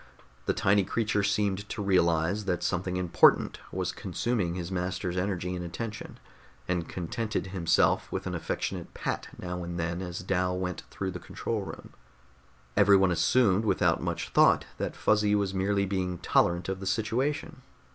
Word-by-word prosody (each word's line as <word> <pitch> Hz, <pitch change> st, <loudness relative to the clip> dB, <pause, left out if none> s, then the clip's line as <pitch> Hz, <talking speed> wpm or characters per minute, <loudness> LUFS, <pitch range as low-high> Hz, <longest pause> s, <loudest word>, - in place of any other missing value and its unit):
The -, -, +2 dB
tiny 100 Hz, +1 st, +3 dB
creature 110 Hz, +2 st, 0 dB
seemed 100 Hz, 0 st, 0 dB
to 105 Hz, -, -3 dB
realize 90 Hz, +1 st, +2 dB
that 90 Hz, -3 st, -1 dB
something 90 Hz, 0 st, -1 dB
important 90 Hz, -2 st, +4 dB
was -, -, -2 dB
consuming 100 Hz, -8 st, -2 dB
his 90 Hz, 0 st, -5 dB
master's 90 Hz, 0 st, -2 dB
energy 90 Hz, -1 st, -1 dB
and 90 Hz, -, -4 dB
attention, 110 Hz, +6 st, -6 dB, 0.5 s
and 90 Hz, -2 st, -1 dB
contented 105 Hz, +6 st, -3 dB
himself 85 Hz, -4 st, +2 dB
with -, -, -3 dB
an -, -, -3 dB
affectionate -, -, -4 dB
pat -, -, -3 dB
now 90 Hz, 0 st, -5 dB
and 85 Hz, 0 st, -5 dB
then 85 Hz, +2 st, -2 dB
as 90 Hz, -1 st, -5 dB
Dal 90 Hz, -1 st, 0 dB
went 90 Hz, -2 st, -3 dB
through 95 Hz, -1 st, -4 dB
the 90 Hz, -, -6 dB
control -, -, -3 dB
room. -, -, -9 dB, 0.8 s
Everyone 100 Hz, -2 st, +5 dB
assumed 100 Hz, +4 st, +3 dB
without 110 Hz, -, +2 dB
much -, -, -3 dB
thought -, -, +5 dB
that -, -, -2 dB
Fuzzy 105 Hz, -1 st, +3 dB
was 100 Hz, -2 st, 0 dB
merely 100 Hz, +1 st, +1 dB
being 95 Hz, -2 st, -2 dB
tolerant 85 Hz, +1 st, +2 dB
of 95 Hz, 0 st, -3 dB
the 95 Hz, -, -5 dB
situation. 130 Hz, +9 st, -1 dB
95 Hz, 155 wpm, -28 LUFS, 90-105 Hz, 0.8 s, Everyone